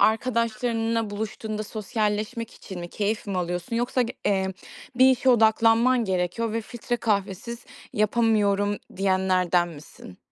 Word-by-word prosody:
arkadaşlarınla 230 -1 +1
buluştuğunda 215 +1 -4
sosyalleşmek 215 +2 -2
için 185 -3 -9
mi? 175 - -6
Keyif 210 +4 -2
mi 195 -2 -2
alıyorsun? 180 +5 -3
Yoksa 245 +2 +1
g 235 - -3
eee, 190 -2 +1 0.4
bir 260 +1 +7
işe 260 0 +1
odaklanman 230 +2 +4
gerekiyor 190 +4 -1
ve 230 - -1
“filtre 240 +2 -4
kahvesiz 210 +1 -2 0.3
yapamıyorum“ 205 -2 +2 0.2
diyenlerden 185 -2 +2
misin? 145 - -12
215 Hz, 120 wpm, -25 LUFS, 195-230 Hz, 0.4 s, bir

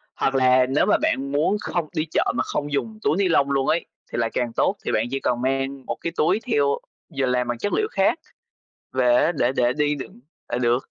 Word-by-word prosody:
Hoặc 135 - 0
là 130 -1 +5
nếu 140 - +2
mà - - +4
bạn 140 +1 0
muốn 155 +8 +2
không 170 -3 -2
đi 155 0 0
chợ - - +1
mà - - +1
không 145 0 -3
dùng 215 +9 -2
túi 160 - +2
ni 200 -2 +2
lông 140 -4 +2
luôn 135 -1 +1
ấy 170 - +1 0.3
thì - - -4
lại 115 -1 +1
càng 120 -2 -1
tốt, - - +1
thì - - 0
bạn 110 - +1
chỉ 135 - -1
cần 120 -2 -1
mang 135 +1 -2
một - - -3
cái 170 - -2
túi 175 +7 +2
theo, 140 -4 +2 0.4
vừa 135 - +2
làm 125 -1 0
bằng 120 - -2
chất 200 +12 -2
liệu 430 - +1
khác - - +2 0.7
về 125 -2 +3
á, 165 - +3
để 120 +2 +2
để 120 0 +3
đi 150 +1 +1
đựng 135 -3 -9 0.3
là 120 - -2
được, 120 +1 0
135 Hz, 240 wpm, -23 LUFS, 125-150 Hz, 0.7 s, là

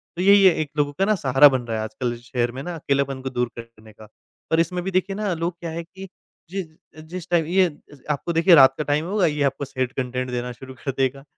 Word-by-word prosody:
तो 175 - -3
यही 200 +1 +6
है 185 - +7
एक 150 - -4
लोगों 145 -1 +1
का 215 - +2
सहारा 135 -4 +6
बन 130 -2 -1
रहा 115 - -2
है 110 - -2
आजकल 120 +2 -3
शहर 120 0 -2
में 130 +2 -7
ना 175 +1 -5
अकेलेपन 140 -3 -1
को 130 - -4
दूर 125 -2 -1
करने 110 -2 -13
का। 110 0 -15 0.4
और 160 - +3
इसमें 175 +2 0
भी 190 - -3
देखिए 190 +2 0
ना 205 -3 -1
लोग 170 +2 -2
क्या 170 - -5
है 170 +1 -5
कि 190 +3 -11 0.4
जि 195 +1 -3 0.5
जिस 180 -1 -7
टाइम 170 -3 +2
ये 185 +3 +3 0.5
आपको 170 +4 -2
देखिए 170 +1 +6
रात 135 -2 +7
का 150 - -1
टाइम 150 +2 0
होगा 195 0 +1
ये 150 -3 0
आपको 140 +1 -1
सैड 130 -1 -3
कंटेंट 125 -1 -3
देना 125 0 -3
शुरू 130 +2 -11
कर 135 - -1
देगा, 135 +1 -1
145 Hz, 245 wpm, -23 LUFS, 130-175 Hz, 0.5 s, है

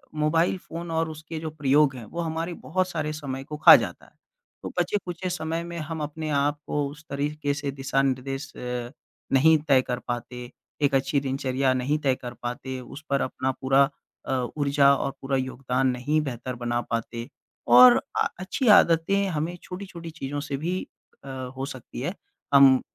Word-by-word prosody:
Mobile 160 +4 +2
phone 170 -1 -7
और 160 0 0
उसके 155 +1 -7
जो 160 0 -4
प्रयोग 145 -2 +3
हैं, 120 - -8
वो 170 +9 -5
हमारे 165 +1 -3
बहुत 185 +3 -2
सारे 155 -3 -2
समय 135 -3 -5
को 150 +2 -7
खा 150 - +10
जाता - - -2
है। - - -22 0.5
तो - - -4
बचे-खुचे 185 -3 -2
समय 165 -1 -2
में 170 0 -7
हम 160 0 -5
अपने 155 +1 -4
आप 145 0 +1
को 145 -1 0
उस 150 +2 -12
तरीक़े 145 +1 -1
से 140 -1 -3
दिशानिर्देश 135 0 -1
अ, 125 -1 -4 0.4
नहीं 160 +4 +6
तय 135 -3 +5
कर 125 -1 -3
पाते, 120 0 -5 0.3
1 140 -1 +2
अच्छी 135 +1 +2
दिनचर्या 135 -1 0
नहीं 130 +4 0
तय 135 -3 +2
कर 120 -1 -8
पाते, 125 +2 -4
उस 130 +4 -10
पर 140 0 +2
अपना 130 0 -1
पूरा 135 +1 +4 0.4
अ, - - -4 0.3
ऊर्जा 140 -1 +4
और 135 0 -2
पूरा 135 0 0
योगदान 130 0 -1
नहीं 130 +5 +1
बेहतर 125 -2 -5
बना 120 0 -1
पाते। 115 0 -4 0.4
और 125 +1 +9 0.2
अ, - - +3
अच्छी 190 +7 -2
आदतें 195 0 +5
हमें 165 +1 -2
छोटी-छोटी 180 -3 -8
चीज़ों 145 -2 -5
से 140 - -1
भी 175 +6 -2 0.4
अ, 140 - -9 0.3
हो 135 - -2
सकती 130 -4 -8
है, 175 +8 -2 0.4
हम 135 -2 +7
140 Hz, 175 wpm, -26 LUFS, 130-160 Hz, 0.5 s, खा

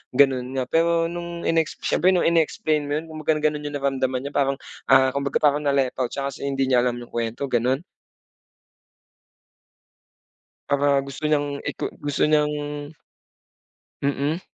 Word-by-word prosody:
gano'n 130 -2 +3
nga. 130 - 0
Pero 165 0 +2
nung 170 0 -6
inex 165 -1 +1
siyempre 185 +3 +3
nung 175 - +2
in-explain 155 -2 +1
mo 145 - -1
yun 155 - -2
kung 155 - -7
baga 155 0 +1
gano'n 150 -1 0
yung 145 - -5
naramdaman 135 -2 -1
niya 140 - -5
parang, 140 -1 +1 0.3
ah, 130 0 +6
kumbaga 140 +1 -1
parang 145 0 +4
na-left 135 -2 +1
out 125 - +1
siya 140 +3 -5
kasi 140 - -6
hindi 135 -1 0
niya 125 - +5
alam 120 - -1
yung - - -15
kwento, 120 +4 -3
gano'n? 125 +5 +1 2.8
Para 140 0 +2
gusto 140 +2 -9
niyang 145 -1 0
iku - - -3 0.2
gusto 145 -1 0
niyang 150 -1 +3 1.5
Mm. 140 +4 0
140 Hz, 155 wpm, -23 LUFS, 135-155 Hz, 2.8 s, ah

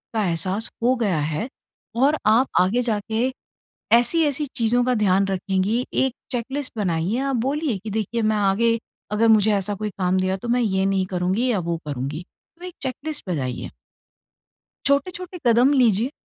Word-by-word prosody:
का 215 - +2
एहसास 185 +5 -1
हो 255 +2 +4
गया 205 -9 0
है 155 - -2 0.5
और 285 +4 +3
आप 225 +5 +4
आगे 205 +7 +2
जाके 225 +2 -1 0.7
ऐसी-ऐसी 295 +3 +2
चीज़ों 245 0 +2
का 255 - +2
ध्यान 195 -2 +2
रखेंगी। 195 +5 0
एक 265 -2 +1 0.2
चेकलिस्ट 265 +3 -3
बनाइए, 180 +1 0
आप 275 -1 -1
बोलिए 270 0 -1
की 210 +3 -8
देखिए 220 +2 -2
मैं 215 0 +1
आगे 210 +4 +2 0.3
अगर 220 +2 +2
मुझे 215 -1 +5
ऐसा 200 +1 -1
कोई 210 +1 -3
काम 185 0 +2
दिया 185 +1 0
तो 235 - -8
मैं 245 +1 +2
ये 190 -3 +1
नहीं 195 -1 +1
करूँगी 185 +8 0
या 205 - +1
वो 170 -1 -2
करूँगी। 145 +5 -4 0.3
तो 360 - -8
एक 360 - -7
चेकलिस्ट 285 +3 -4
बनाइए। 130 -7 -3 1.2
छोटे-छोटे 360 +5 -1
कदम 245 +5 +5
लीजिए। 230 +3 +2
220 Hz, 160 wpm, -23 LUFS, 190-255 Hz, 1.2 s, मुझे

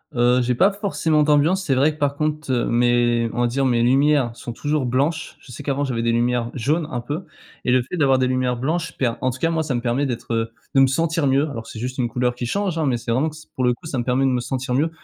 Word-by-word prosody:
Heu, 120 +1 +3
j'ai 125 0 0
pas 190 - +4
forcément 195 -6 0
d'ambiance, 150 +6 +3
c'est 135 -7 +1
vrai 145 +4 +3
que 155 - -17
par 140 -1 0
contre, 150 -1 -2
heu, 120 -2 +1
mes, 120 -1 +2
on 120 - -2
va 120 - +3
dire, 135 +4 -1
mes 120 -2 +2
lumières 135 -1 +3
sont 120 - -7
toujours 145 +1 -1
blanches. 145 +6 -1
Je 130 - -15
sais 125 - -8
qu'avant 140 0 -1
j'avais 125 -4 -2
des 115 0 +1
lumières 120 0 +1
jaunes, 150 +6 0
un 125 - -3
peu, 145 +9 -5 0.4
et 125 - +1
le 130 -1 +3
fait 130 - -6
d'avoir 140 -5 +3
des 130 - +2
lumières 130 -1 0
blanches 165 +7 -2
per 125 -3 +1
en 130 - +1
tout 125 - -5
cas 165 +5 0
moi 160 -1 0
ça 150 -5 -2
me 120 - -1
permet 125 +4 0
d'être, 120 -2 -4
heu, 115 0 -1 0.2
de 135 - +4
me 135 - +6
sentir 165 +2 0
mieux. 135 +3 +2
Alors 115 -6 -7
c'est 115 - -9
juste 125 +4 -5
une 120 - +1
couleur 125 +1 0
qui 120 0 -4
change, 190 +2 -1
hein, 155 - +1
mais 125 -3 +1
c'est 115 0 -4
vraiment 135 +7 +1
s 155 0 -13
pour 130 - -1
le 125 - +4
coup, - - -18
ça 140 -5 -3
me - - -1
permet 130 +2 +1
de 135 - +2
me 125 - +1
sentir 130 0 -3
mieux. 150 +6 +2
130 Hz, 285 wpm, -22 LUFS, 120-150 Hz, 0.4 s, me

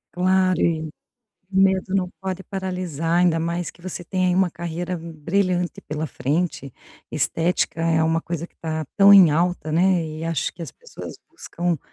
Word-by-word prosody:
Claro, 185 0 +2
e 160 -2 0 0.6
o 195 - -4
medo 190 0 +3
não 185 -2 0
pode 190 0 -4
paralisar, 180 -4 -2
ainda 170 -2 +3
mais 170 +1 -2
que - - -23
você 180 0 -6
tem 185 +1 0
aí 180 - +2
uma 190 -1 +3
carreira 170 +2 -4
brilhante 175 +3 -1
pela 155 +1 -4
frente. 145 +1 -2 0.4
Estética 165 0 0
é 165 -1 +2
uma 165 +1 +1
coisa 170 0 -4
que - - -36
tá 160 -1 -3
tão 200 0 +9
em 185 -5 +8
alta, 165 0 0
né, 180 0 +3
e 155 +1 -6
acho 165 -4 -1
que 175 - -17
as 165 - -5
pessoas 485 +1 -10 0.2
buscam 175 - -3
175 Hz, 170 wpm, -23 LUFS, 165-185 Hz, 0.6 s, tão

